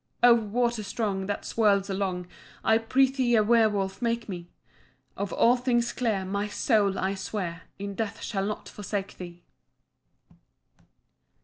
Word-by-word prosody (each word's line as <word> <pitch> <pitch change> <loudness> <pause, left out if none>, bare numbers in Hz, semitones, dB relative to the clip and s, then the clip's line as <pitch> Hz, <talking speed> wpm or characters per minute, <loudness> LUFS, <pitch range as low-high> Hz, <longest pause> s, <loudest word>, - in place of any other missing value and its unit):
"Oh 245 -1 +9
water 235 +1 0
strong, 200 -2 -2
that 205 - -3
swirls 200 -3 +2
along, 190 -2 -2 0.4
I 220 0 +4
prithee 260 +1 +2
a 215 - +5
werwolf 210 -3 +2
make 235 -1 -1
me. 175 -3 -7 0.7
Of 200 -1 -3
all 245 +2 +4
things 240 -1 +1
dear, 220 -6 0
my 200 +2 -2
soul, 205 -2 +1
I 190 +1 0
swear, 185 -3 -4
In 200 0 -5
death 215 0 -4
shall 195 -2 -2
not 210 - -5
forsake 200 -1 -5
thee." 175 -1 -9
205 Hz, 135 wpm, -27 LUFS, 195-230 Hz, 0.7 s, Oh